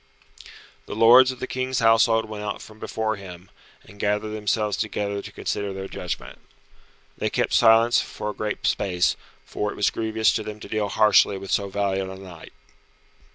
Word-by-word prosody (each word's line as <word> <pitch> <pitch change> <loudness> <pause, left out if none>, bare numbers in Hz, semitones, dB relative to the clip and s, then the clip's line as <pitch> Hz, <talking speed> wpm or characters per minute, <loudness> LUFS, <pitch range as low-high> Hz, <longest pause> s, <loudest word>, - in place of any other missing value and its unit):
'" - - -19
The - - -6
lords 125 +4 +7
of 130 - -10
the - - -3
King's 130 0 -3
household 115 -1 +4
went 110 -1 -7
out 105 -1 -4
from 110 0 -13
before 110 -1 -2
him, 90 -2 -11 0.3
and 105 - -17
gathered 105 +1 0
themselves 105 0 -1
together 100 -1 -3
to - - -10
consider 100 -1 -3
their 95 0 -6
judgment. - - -6 0.8
They - - 0
kept - - -1
silence 115 +1 +5
for 105 - -5
a - - -10
great 105 0 -4
space, 90 -4 +1 0.3
for 105 - -3
it - - -9
was 105 - +1
grievous 110 0 +1
to 110 - -1
them 105 0 -7
to - - -8
deal 105 -2 -2
harshly 105 -2 +4
with 95 0 -8
so 100 -1 0
valiant 95 -1 -1
a 95 - -7
knight. 90 -4 -12
105 Hz, 185 wpm, -24 LUFS, 100-110 Hz, 0.8 s, lords